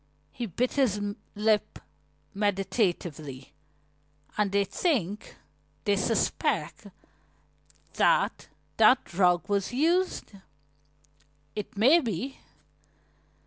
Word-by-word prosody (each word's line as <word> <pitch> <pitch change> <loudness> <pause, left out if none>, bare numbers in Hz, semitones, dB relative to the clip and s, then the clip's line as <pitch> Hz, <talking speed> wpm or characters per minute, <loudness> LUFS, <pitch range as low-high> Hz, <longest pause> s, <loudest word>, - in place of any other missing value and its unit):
He 240 -2 -5
bit 240 +7 -1
his 250 -8 +2 0.4
lip 210 0 +1 0.6
meditatively. 180 - -2 0.8
"And 210 -2 +1
they 200 0 +2
think 210 - -2 0.5
they 205 -1 +2
suspect 210 +3 -1 1.1
that - - +2 0.3
that 260 - +5
drug 180 -1 +2
was 200 0 0
used? 340 +8 +1 1.2
It 210 -1 -6
may 265 +11 +6
be." 250 - -4
210 Hz, 80 wpm, -28 LUFS, 195-250 Hz, 1.2 s, may